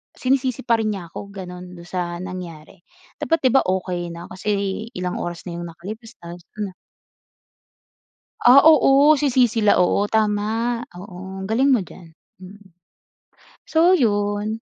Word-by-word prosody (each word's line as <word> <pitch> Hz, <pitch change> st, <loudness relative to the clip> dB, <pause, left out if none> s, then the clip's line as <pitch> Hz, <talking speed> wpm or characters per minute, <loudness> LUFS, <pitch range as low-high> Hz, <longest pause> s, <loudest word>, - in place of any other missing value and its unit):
sinisisi 260 Hz, -1 st, 0 dB
pa 230 Hz, -1 st, +3 dB
rin 215 Hz, -1 st, 0 dB
niya 175 Hz, -4 st, -9 dB
ako, 200 Hz, -, -8 dB
gano'n, 180 Hz, -2 st, -9 dB
do'n -, -, -11 dB
sa 175 Hz, -2 st, -3 dB
nangyari. 175 Hz, -5 st, -9 dB, 0.4 s
Dapat, 325 Hz, -2 st, 0 dB
'di -, -, +2 dB
ba, -, -, +8 dB
okey 180 Hz, -1 st, -2 dB
na 170 Hz, -, -9 dB
kasi 200 Hz, +2 st, -2 dB
ilang 180 Hz, 0 st, -3 dB
oras 175 Hz, 0 st, -5 dB
na 170 Hz, -, -5 dB
yung 175 Hz, -, -6 dB
nakalipas, 215 Hz, +8 st, -10 dB
ayos 170 Hz, +1 st, -9 dB, 0.2 s
na. 205 Hz, -2 st, -3 dB, 1.7 s
Ah, 250 Hz, +3 st, +9 dB
oo. 295 Hz, 0 st, +6 dB
Si 290 Hz, -1 st, +1 dB
CC 240 Hz, -3 st, +2 dB
la 205 Hz, -, +4 dB
oo, 180 Hz, +3 st, +2 dB
tama, 220 Hz, +2 st, 0 dB, 0.2 s
oo. 190 Hz, 0 st, -9 dB
Ang 190 Hz, -, -6 dB
galing 255 Hz, +6 st, +2 dB
mo 250 Hz, -, +4 dB
diyan, 180 Hz, -2 st, -11 dB, 0.3 s
mm. 200 Hz, +2 st, -13 dB, 1.0 s
So, 330 Hz, +2 st, +4 dB
yun. 205 Hz, -, 0 dB
205 Hz, 150 wpm, -21 LUFS, 180-235 Hz, 1.7 s, Ah